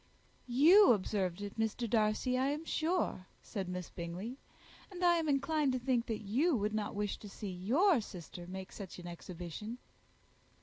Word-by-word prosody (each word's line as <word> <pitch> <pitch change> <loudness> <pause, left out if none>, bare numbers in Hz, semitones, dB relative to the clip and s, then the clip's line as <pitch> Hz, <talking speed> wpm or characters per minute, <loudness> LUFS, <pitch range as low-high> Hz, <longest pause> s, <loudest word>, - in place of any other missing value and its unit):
"You 315 +8 +7
observed 195 -2 -1
it, 205 +2 -7
Mr. 225 +2 0
Darcy, 215 +3 +2
I 260 +1 +2
am 295 +3 -2
sure," 320 - 0 0.2
said 195 -5 -4
Miss 180 -1 -5
Bingley; 185 +10 -6 0.5
"and 365 -2 -2
I 345 -1 +6
am 320 -2 0
inclined 280 0 +2
to 255 - 0
think 245 -1 0
that 220 -1 -3
you 270 - +2
would 210 -1 0
not 215 -2 -2
wish 205 0 -2
to 210 - -9
see 200 0 -6
your 250 - +3
sister 175 -3 -9
make 190 +1 -7
such 195 -4 -8
an 175 - -9
exhibition." 175 +5 -7
220 Hz, 170 wpm, -34 LUFS, 190-275 Hz, 0.5 s, You